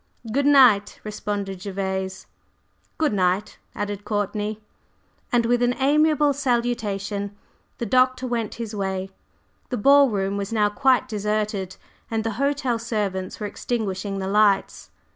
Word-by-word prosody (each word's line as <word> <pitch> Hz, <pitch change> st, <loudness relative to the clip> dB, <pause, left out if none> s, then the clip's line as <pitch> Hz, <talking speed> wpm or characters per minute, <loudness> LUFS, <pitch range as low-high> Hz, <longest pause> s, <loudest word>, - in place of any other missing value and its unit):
"Good 280 Hz, +4 st, +1 dB
night!" 245 Hz, -8 st, +5 dB
responded 205 Hz, -3 st, -4 dB
Gervase. 190 Hz, -1 st, -3 dB, 0.7 s
"Good 310 Hz, -7 st, +1 dB
night!" 190 Hz, +2 st, 0 dB, 0.2 s
added 205 Hz, -1 st, -4 dB
Courtney. 210 Hz, +1 st, -2 dB, 0.7 s
And 235 Hz, -1 st, +3 dB
with 240 Hz, +1 st, +2 dB
an 245 Hz, 0 st, +2 dB
amiable 295 Hz, +1 st, +3 dB
salutation 215 Hz, -6 st, -2 dB, 0.4 s
the 235 Hz, -, -3 dB
Doctor 255 Hz, +3 st, +2 dB
went 235 Hz, -3 st, -2 dB
his 230 Hz, -2 st, -6 dB
way. 190 Hz, -1 st, -3 dB, 0.6 s
The 250 Hz, -, -2 dB
ball 275 Hz, +4 st, +6 dB
room 200 Hz, -2 st, -1 dB
was 200 Hz, +1 st, -4 dB
now 210 Hz, -2 st, +2 dB
quite 255 Hz, +3 st, +2 dB
deserted, 210 Hz, -3 st, -2 dB, 0.3 s
and 225 Hz, -1 st, -1 dB
the 225 Hz, -, -1 dB
hotel 275 Hz, -4 st, 0 dB
servants 205 Hz, -5 st, -3 dB
were 210 Hz, -, -3 dB
extinguishing 200 Hz, -3 st, -3 dB
the 190 Hz, -1 st, -3 dB
lights. 205 Hz, -1 st, +2 dB
210 Hz, 130 wpm, -23 LUFS, 200-245 Hz, 0.7 s, ball